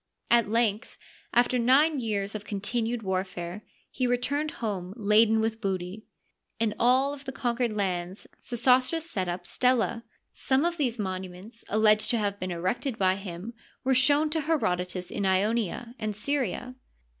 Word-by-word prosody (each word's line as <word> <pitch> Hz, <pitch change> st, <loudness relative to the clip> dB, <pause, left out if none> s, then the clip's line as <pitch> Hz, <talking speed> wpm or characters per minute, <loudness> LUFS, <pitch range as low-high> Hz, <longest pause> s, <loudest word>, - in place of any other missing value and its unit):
At 235 Hz, -3 st, +4 dB
length, 225 Hz, 0 st, 0 dB, 0.3 s
after 245 Hz, +1 st, +3 dB
nine 275 Hz, +5 st, +4 dB
years 205 Hz, -4 st, -2 dB
of 215 Hz, -1 st, -5 dB
continued 225 Hz, +3 st, -2 dB
warfare, 185 Hz, -1 st, -3 dB, 0.3 s
he 255 Hz, -1 st, 0 dB
returned 285 Hz, +5 st, 0 dB
home 195 Hz, -7 st, -4 dB
laden 220 Hz, +1 st, +4 dB
with 220 Hz, 0 st, -1 dB
booty. 190 Hz, +1 st, -3 dB, 0.5 s
In 225 Hz, -2 st, +1 dB
all 260 Hz, +4 st, +3 dB
of 285 Hz, -1 st, -10 dB
the 265 Hz, -, -4 dB
conquered 240 Hz, -3 st, -1 dB
lands 185 Hz, -1 st, -2 dB
Sesostris 255 Hz, +7 st, +2 dB
set 190 Hz, -, -2 dB
up 175 Hz, 0 st, -4 dB
stelae. 250 Hz, -1 st, +1 dB, 0.3 s
Some 265 Hz, +4 st, +1 dB
of 345 Hz, 0 st, 0 dB
these 250 Hz, -6 st, 0 dB
monuments 190 Hz, +2 st, -5 dB
alleged 215 Hz, 0 st, +4 dB
to 240 Hz, -, +2 dB
have 205 Hz, -2 st, -1 dB
been 185 Hz, -, -3 dB
erected 185 Hz, +8 st, -2 dB
by 185 Hz, -1 st, +3 dB
him 195 Hz, +3 st, -7 dB, 0.3 s
were 265 Hz, -, +2 dB
shown 290 Hz, +4 st, +4 dB
to 320 Hz, 0 st, +1 dB
Herodotus 180 Hz, -, -1 dB
in 200 Hz, -, -2 dB
Ionia 215 Hz, +4 st, 0 dB
and 215 Hz, -1 st, -3 dB
Syria. 250 Hz, 0 st, -2 dB
225 Hz, 150 wpm, -27 LUFS, 195-250 Hz, 0.5 s, At